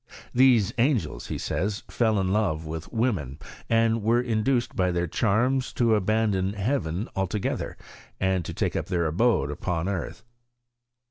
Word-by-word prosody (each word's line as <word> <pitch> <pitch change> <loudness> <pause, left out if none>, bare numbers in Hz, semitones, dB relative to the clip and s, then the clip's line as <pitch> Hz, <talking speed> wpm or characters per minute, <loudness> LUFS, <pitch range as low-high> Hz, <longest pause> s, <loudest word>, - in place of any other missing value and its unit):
These 125 -6 +4
angels, 125 -2 0
he - - -3
says, 100 +2 -2
fell 110 -3 +1
in 95 0 0
love 90 -7 0
with 80 +1 -6
women, 100 - -1 0.3
and 115 0 +3
were 115 +3 +3
induced 120 +1 0
by 90 -3 +2
their 85 0 0
charms 120 +9 +1
to 115 -2 +2
abandon 105 -2 +1
heaven 100 - -1
altogether, 95 +1 -2 0.4
and 95 -1 +1
take - - -2
up - - -2
their 85 -2 0
abode 80 - +2
upon 85 +3 -2
earth. 95 -3 -4
105 Hz, 140 wpm, -26 LUFS, 90-115 Hz, 0.4 s, These